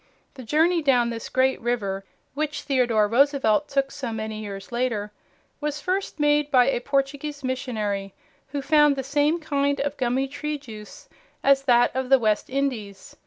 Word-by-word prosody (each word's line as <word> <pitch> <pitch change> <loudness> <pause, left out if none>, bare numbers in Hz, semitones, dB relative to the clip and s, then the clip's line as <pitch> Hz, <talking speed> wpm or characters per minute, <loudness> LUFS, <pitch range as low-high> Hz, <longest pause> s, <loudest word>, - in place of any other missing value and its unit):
The 265 - -10
journey 320 +8 +2
down 250 -5 +2
this 230 -1 -6
great 260 0 +1
river 205 -5 -2 0.3
which 300 +2 -3
Theodore 240 -6 +2
Roosevelt 275 +2 +2
took 275 -1 0
so 255 -5 -5
many 220 -1 -4
years 200 -1 -8
later 235 -4 -1 0.5
was 300 0 -3
first 370 +1 -2
made 295 0 +2
by 255 -3 +5
a 245 - -1
Portuguese 280 +2 -2
missionary, 215 -7 -3 0.3
who 280 0 -4
found 295 -1 +4
the 270 - -3
same 295 +4 +1
kind 285 -2 0
of 285 +1 -3
gummy 260 +2 0
tree 300 +2 -4
juice 220 -7 -12 0.4
as 275 0 +5
that 245 -1 +4
of 260 -1 -2
the 270 - +7
West 215 -4 0
Indies. 240 -8 -3
265 Hz, 165 wpm, -24 LUFS, 230-290 Hz, 0.5 s, the